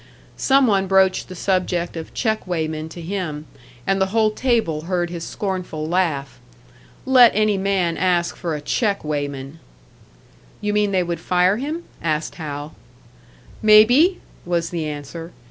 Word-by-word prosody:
Some 270 0 +4
one 195 -4 +2
broached 190 -1 +3
the 185 - -8
subject 180 -2 -1
of 160 -1 -7
check 220 -5 -1
weighmen 160 -2 -3
to 175 - -10
him, 165 -4 -4 0.4
and 195 +4 +1
the 190 - +3
whole 215 +2 +2
table 215 -11 0
heard 175 -1 -1
his 170 -2 -5
scornful 180 -5 -4
laugh. 160 -7 -1 0.7
Let 255 -3 +7
any 215 -1 +3
man 190 -4 0
ask 175 -2 +1
for 170 -3 -3
a 150 - -5
check 200 +6 0
weighman! 145 0 -4 1.0
"You 210 0 -2
mean 210 -1 +2
they 190 -2 +1
would 170 -1 -3
fire 180 +3 +2
him?" 305 +7 -4 0.2
asked 155 -1 -1
Hal. 145 0 -6 0.9
"Maybe!" 240 - +6 0.2
was 170 -1 -1
the 165 -3 -2
answer. 150 +3 -7
180 Hz, 145 wpm, -21 LUFS, 160-205 Hz, 1.0 s, Let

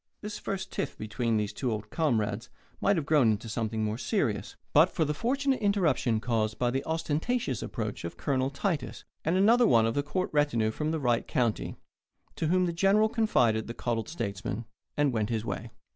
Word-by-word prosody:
This 210 0 -5
first 190 -1 -4
tiff - - -3
between 110 +1 -1
the 105 -1 0
two 120 +4 -3
old 105 0 -4
comrades 115 -9 0 0.3
might 200 - +3
have 160 -5 -1
grown 145 -6 +4
into 105 +2 -5
something 110 -1 -2
more 110 +2 -2
serious, - - -1 0.2
but - - +6
for 160 - 0
the 150 - 0
fortunate 270 - 0
interruption 180 - +2
caused 110 -2 -1
by 120 -1 +1
the 135 +2 -1
ostentatious 160 - -1
approach 105 -3 -4
of 85 - -6
Colonel 130 -2 0
Titus 155 +3 -3 0.2
and 165 +4 +1
another 230 +5 +5
one 115 - +5
of 115 - +1
the 145 - +1
court 150 +6 -2
retinue 130 -7 +2
from 150 +7 -2
the 160 0 -1
right 120 -4 +1
county, 120 -4 0 0.6
to 160 - -1
whom 185 +2 +3
the 170 - -1
General 200 +5 +4
confided 125 - +2
the 115 - -6
coddled 115 0 -2
statesman 110 - -4 0.3
and 145 -3 +2
went 110 -2 0
his 115 -1 -1
way. 115 0 -4
130 Hz, 190 wpm, -29 LUFS, 110-170 Hz, 0.6 s, but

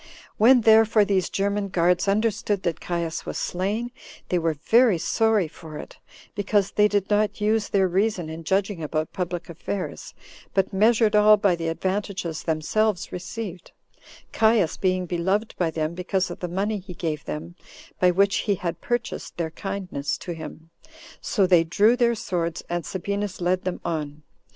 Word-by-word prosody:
When, 245 +3 +6
therefore, 220 -1 +5
these 190 -3 +1
German 200 +1 -1
guards 180 0 +2
understood 210 -1 0
that 170 -3 -1
Caius 170 -2 -3
was - - -5
slain, 210 +7 -2 0.4
they 180 - +2
were 165 -1 0
very 225 - +4
sorry 220 +1 +2
for 155 -1 -10
it, - - -10 0.4
because 205 -1 +1
they 210 0 +4
did 205 -2 0
not 210 0 +1
use 210 0 +1
their 195 -2 +3
reason 190 -1 0
in 160 +1 -7
judging 195 +1 0
about 155 0 -2
public 175 -3 -3
affairs, 180 +3 -5 0.4
but 195 0 +1
measured 220 +1 +3
all 210 0 +7
by 200 -3 +2
the 165 -1 -4
advantages 185 -1 -2
themselves 180 +5 0
received, 180 0 -7 0.6
Caius 220 -7 +3
being 185 -1 0
beloved 190 +5 -1
by 175 -2 +2
them 155 0 -2
because 180 +1 -1
of - - -7
the 180 - -3
money 200 +4 -1
he 180 -1 -10
gave 155 -4 -3
them, 165 +3 -6 0.5
by 180 - +5
which 195 +2 +3
he 205 - 0
had 170 -2 -4
purchased 240 -1 -3
their 165 -2 -2
kindness 185 -6 -4
to 175 - -7
him; 165 0 -9 0.5
so 200 -4 +1
they 175 -3 +5
drew 210 +8 +3
their 235 -1 +2
swords, 175 -7 -3
and 175 -3 -3
Sabinus 200 +1 -3
led 180 +1 0
them 185 -1 -2
on. 150 -2 -4
190 Hz, 165 wpm, -24 LUFS, 170-210 Hz, 0.6 s, all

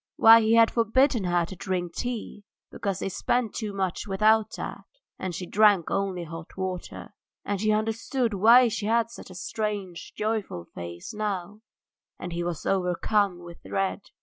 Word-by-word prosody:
Why, 225 +1 +8
he 220 +1 +3
had 230 -1 +6
forbidden 235 -1 +2
her 175 -1 +1
to 190 - -9
drink 180 -2 -3
tea 230 -3 -5 0.3
because 195 -3 -3
they - - -3
spent 230 +4 -1
too 215 -3 -4
much 195 0 -3
without 215 +2 +3
that, - - -7 0.3
and 185 -2 -4
she 180 - -5
drank 205 -2 +3
only 195 -3 -1
hot 165 +1 -10
water. 185 -1 -5 0.3
And 200 -1 -2
he 215 0 +2
understood 225 +3 -1
why 230 +6 +6
she 210 -1 -3
had 230 0 +2
such - - -11
a 185 - -11
strange, 200 -2 -4
joyful 210 - -2
face 85 0 -7
now, 210 -1 -4 0.6
and 175 -1 -6
he 170 +1 -2
was 170 -2 -4
overcome 185 0 0
with 170 0 -12
dread. 195 +1 -2
200 Hz, 165 wpm, -26 LUFS, 180-220 Hz, 0.6 s, Why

